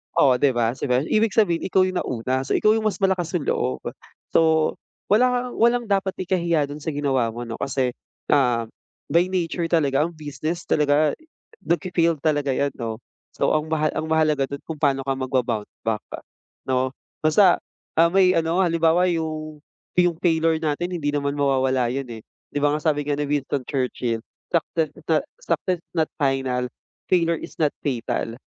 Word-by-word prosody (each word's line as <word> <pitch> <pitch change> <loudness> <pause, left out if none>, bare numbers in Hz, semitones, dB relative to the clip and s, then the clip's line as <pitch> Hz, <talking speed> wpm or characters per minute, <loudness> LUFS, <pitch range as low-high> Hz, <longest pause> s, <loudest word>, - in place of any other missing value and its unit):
Oh, 130 -3 +4
'di 135 -2 +3
ba? 115 -1 +2
Sabihin 130 +2 0
ibig 215 -1 +2
sabihin 175 -7 +2
ikaw 190 0 +3
yung 185 -1 0
nauna 130 +2 -2
so - - 0
ikaw 215 - +4
yung 220 -1 +2
mas 210 - -2
malakas 185 -4 +1
yung 150 - -1
loob. 65 - -1 0.5
So 160 -1 +3 0.4
wala 250 +3 +3
kang - - -8
walang 235 +1 +3
dapat 195 -1 +1
ikahiya 170 -5 +1
do'n 145 +1 -7
sa 160 - -2
ginawa 135 -4 +1
mo 120 +2 -6
'no, 115 -1 -6
kasi, 130 -2 0 0.4
ah, 120 -5 +3 0.4
by 170 +2 +4
nature 170 -2 -1
talaga 145 -4 +3
ang 170 - -2
business 155 +3 -4
talaga 150 0 +3 0.5
nagfe-failed 170 -2 +1
talaga 145 -3 +1
'yan 140 -1 0
'no. 115 -1 -4 0.4
So - - +1
ang 155 0 0
mahal 155 -1 +1
ang 160 - -3
mahalaga 155 -3 +2
do'n 140 0 -7
kung 160 -2 -6
paano 140 -2 +2
ka 135 0 0
magba-bounce 125 -5 -1
back 110 -1 -1 0.7
'no? 130 0 +1 0.3
Basta, 175 +4 +5 0.4
ah, 170 +1 +6
may 185 -1 +4
ano 165 +2 +1
halimbawa 170 +1 +3
yung, 155 -2 -4 0.4
yung 175 -1 +4
failure 160 -2 +2
natin 160 +4 -1
hindi 145 -2 -1
naman 140 0 -1
mawawala 130 -3 +2
'yon, 135 +1 -3
eh, 110 -1 -8 0.3
'di 145 - -2
ba 145 - +4
nga - - -2
sabi 150 -2 +1
nga 145 - +1
ni 145 - -2
Winston 140 -1 -1
Churchill, 125 -4 -1 0.3
success 165 -1 0 0.2
sa 160 - +3 0.2
"Success 185 - -1
is - - -36
not 160 -1 +1
final, 135 -3 0 0.4
failure 170 -3 +2
is - - -9
not 150 -2 +1
fatal" 120 -3 -2
155 Hz, 175 wpm, -23 LUFS, 135-170 Hz, 0.7 s, ah